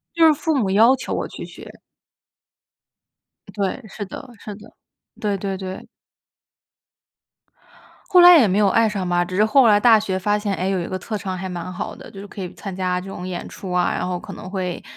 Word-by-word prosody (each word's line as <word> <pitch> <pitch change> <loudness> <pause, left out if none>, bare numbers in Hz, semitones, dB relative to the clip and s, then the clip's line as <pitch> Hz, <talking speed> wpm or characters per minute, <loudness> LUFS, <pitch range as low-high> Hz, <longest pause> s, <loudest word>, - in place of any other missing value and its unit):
就 330 -1 +6
是 315 - +7
父 310 +2 -1
母 205 -7 0
要 225 +6 +5
求 - - -5
我 - - -2
去 - - -8
学。 - - -12 1.8
对， 200 +5 -3
是 205 +1 -6
的， 265 - -9
是 210 - -8
的。 215 - -15 0.5
对， 205 -2 0
对， 195 0 -4
对。 190 -1 -7 2.2
后 365 -3 +6
来 355 0 +10
也 235 - +5
没 195 +2 +1
有 205 -2 +4
爱 225 +3 +3
上 195 -4 -3
吧， 175 0 +2
只 185 +1 -6
是 210 - +4
后 260 +2 +5
来 205 -1 +5
大 225 -2 +6
学 190 -3 -2
发 205 +2 0
现， 205 -2 -2
诶， 185 +1 -2
有 190 -2 0
一 170 - -4
个 185 - -4
特 215 +3 -5
长 190 -2 -4
还 190 +1 -5
蛮 180 0 -6
好 180 - -5
的， - - -12
就 195 - -10
是 205 - -9
可 205 - -10
以 180 - -5
参 195 -3 -7
加 180 -1 -1
这 190 - -11
种 180 -1 -7
演 180 -1 -5
出 190 - -9
啊， 180 0 +1
然 - - -2
后 180 -1 -2
可 - - -10
能 185 - -9
会， 185 -3 -4
195 Hz, 235 characters per minute, -21 LUFS, 185-215 Hz, 2.2 s, 来